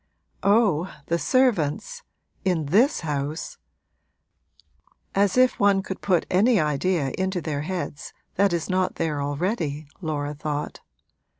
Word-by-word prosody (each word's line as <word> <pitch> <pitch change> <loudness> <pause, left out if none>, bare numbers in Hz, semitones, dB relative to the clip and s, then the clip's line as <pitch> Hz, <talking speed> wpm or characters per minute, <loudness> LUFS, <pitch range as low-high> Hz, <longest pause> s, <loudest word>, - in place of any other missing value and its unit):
'Oh, 200 -5 +3
the 170 0 0
servants 255 - +1 0.4
in 180 -5 +1
this 215 - +3
house; 150 0 -3 1.5
as 200 +2 +2
if 255 0 +4
one 200 -1 +4
could 190 - -6
put 185 -3 +2
any 215 +5 +4
idea 150 -1 0
into 190 -1 0
their 150 -4 -3
heads 170 -3 -4 0.2
that 200 0 +3
is 170 -2 -1
not 185 -1 0
there 155 -3 -1
already!' 150 0 -2 0.2
Laura 150 -3 -2
thought. 150 0 -4
175 Hz, 120 wpm, -24 LUFS, 150-200 Hz, 1.5 s, if